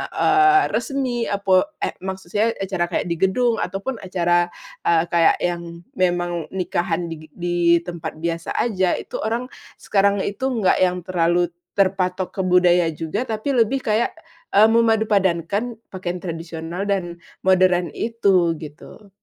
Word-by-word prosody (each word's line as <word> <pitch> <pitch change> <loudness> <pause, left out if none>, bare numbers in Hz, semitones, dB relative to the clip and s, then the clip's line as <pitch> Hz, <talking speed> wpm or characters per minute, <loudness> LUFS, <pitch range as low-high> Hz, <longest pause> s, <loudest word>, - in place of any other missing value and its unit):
eee, 390 0 +5
resmi 255 -4 -1
apo 200 +8 +1
eh - - 0
maksud 190 -2 -7
saya 210 +2 +2
acara 190 -3 -2
kayak 175 - -2
di - - +1
gedung 225 +5 +2
ataupun 195 +8 -3
acara, 175 -2 +1 0.4
eee, 165 -1 +4
kayak 170 -2 +4
yang 170 -1 -3 0.2
memang 175 -2 0
nikahan 175 -2 -1
digi 155 -1 -8
di 175 0 -3 0.3
tempat 170 -2 -6
biasa 165 0 -3
aja, 190 -6 +1
itu - - -6
orang 235 +3 -2 0.3
sekarangnya 200 0 +2
itu 205 +6 -5
nggak 215 -6 +2
yang 180 0 -2
terlalu 175 -1 +1 0.2
terpatok 185 -1 0
ke 190 - -4
budaya 180 -1 +4
juga 165 +10 -3
tapi 220 +4 -3
lebih 255 +1 +2
kayak, 220 +2 +1 0.4
eee, 215 +2 +7
memadupadankan 215 -2 +1 0.2
pakaian 180 -2 -4
tradisional 165 +1 -5
dan 180 -4 -2 0.3
modern 185 -2 +3
itu, 195 -7 +2
gitu. 160 +7 -12
185 Hz, 135 wpm, -21 LUFS, 175-215 Hz, 0.4 s, eee